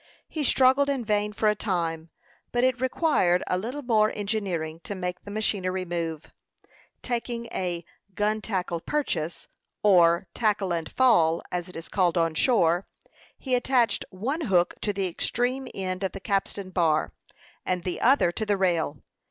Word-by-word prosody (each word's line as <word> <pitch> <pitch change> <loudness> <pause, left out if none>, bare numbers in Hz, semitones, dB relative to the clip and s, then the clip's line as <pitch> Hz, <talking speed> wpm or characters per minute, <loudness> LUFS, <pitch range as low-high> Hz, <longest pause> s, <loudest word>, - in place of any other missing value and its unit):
He 310 - -3
struggled 265 +1 +4
in 265 -4 -1
vain 210 -1 +1
for 215 +1 0
a 210 - +5
time; 170 -6 -2 0.4
but 245 0 +1
it 255 -1 +2
required 255 - +2
a - - 0
little 245 +10 -4
more 220 -3 +3
engineering 190 -7 -2
to 205 - -5
make 180 -1 -4
the - - -11
machinery 190 -3 -1
move. 165 -3 -4 0.7
Taking 235 -1 -3
a 175 -3 -3 0.3
"gun 215 +1 0
tackle 180 -5 -2
purchase," 170 - -2 0.4
or 175 -4 +5
"tackle 205 -5 +1
and 165 -2 -3
fall," 170 -11 +4
as 180 0 -3
it - - -13
is 165 - -7
called 180 -3 +1
on 165 -1 +2
shore, 175 -2 +2 0.5
he 260 - -4
attached 245 -4 +2
one 250 - -3
hook 185 - +2
to 210 - 0
the 195 -1 -1
extreme 245 +9 -1
end 185 0 -3
of 190 - -1
the 195 - -6
capstan 195 -1 -2
bar, 160 -4 +1 0.5
and 180 -1 -1
the 180 - -3
other 250 -8 +4
to 220 - -3
the 205 -2 +1
rail. 170 -7 0
195 Hz, 160 wpm, -26 LUFS, 175-230 Hz, 0.7 s, a